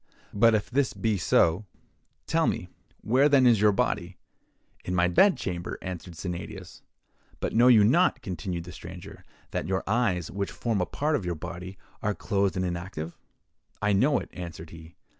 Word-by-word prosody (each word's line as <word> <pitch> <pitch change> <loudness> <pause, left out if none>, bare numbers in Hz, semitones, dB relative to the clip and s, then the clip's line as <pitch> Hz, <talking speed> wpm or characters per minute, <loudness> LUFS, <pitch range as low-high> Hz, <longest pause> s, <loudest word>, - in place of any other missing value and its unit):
But 115 +2 +5
if 105 - -1
this 130 -3 +1
be 110 -3 -1
so, 85 +3 +2 0.6
tell - - +1
me - - -2 0.3
where 130 +6 +3
then 140 -3 +5
is 115 -4 +5
your 105 0 +6
body?'—'In 90 -1 -5
my 90 0 +3
bed 185 - +4
chamber,' 85 -2 -4
answered 90 -2 -6
Sennadius. 90 0 -7 0.6
'But - - -2
know 120 +2 +5
you 115 -5 +7
not,' 165 - +3
continued 90 -1 -4
the 90 - -10
stranger, - - -10 0.3
'that - - -3
your 95 +1 -1
eyes, 105 -7 0
which 100 0 -3
form 115 -5 -1
a 90 - -1
part 150 +2 0
of 130 - -2
your 90 -1 -2
body, 90 +3 -7 0.2
are 105 -1 -1
closed 100 -3 0
and 95 - 0
inactive?'—'I 85 +3 -6
know 130 +8 +3
it,' - - -6
answered 85 -3 -8
he. 80 0 -13
95 Hz, 165 wpm, -27 LUFS, 90-115 Hz, 0.6 s, you